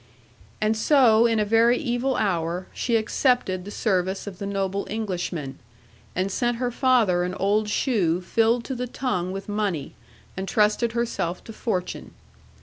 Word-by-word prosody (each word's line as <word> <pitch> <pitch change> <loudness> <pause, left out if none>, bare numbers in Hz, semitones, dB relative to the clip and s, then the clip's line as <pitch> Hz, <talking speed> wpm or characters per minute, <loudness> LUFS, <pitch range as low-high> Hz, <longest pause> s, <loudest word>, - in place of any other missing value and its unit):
'And 215 +1 +1
so, 235 -2 +5
in 225 -1 +1
a 210 - +2
very 230 +3 +4
evil 250 -1 -1
hour, 175 -2 -1
she 235 - 0
accepted 220 -4 +1
the - - -7
service 190 -3 -1
of 195 -3 -8
the 200 - -4
noble 195 0 -2
Englishman, 180 -9 -4 0.6
and 185 +2 -1
sent 240 +2 0
her 245 0 -1
father 235 -9 +3
an 180 +1 -2
old 210 +2 +1
shoe 195 - +1
filled 225 +5 +1
to 265 - -4
the 250 0 -3
tongue 185 -8 -2
with 195 +1 -6
money, 205 -8 -2 0.4
and 190 +1 -4
trusted 215 +3 +2
herself 230 -7 -2
to 225 - -10
fortune. 185 -5 -4
210 Hz, 155 wpm, -24 LUFS, 185-235 Hz, 0.6 s, so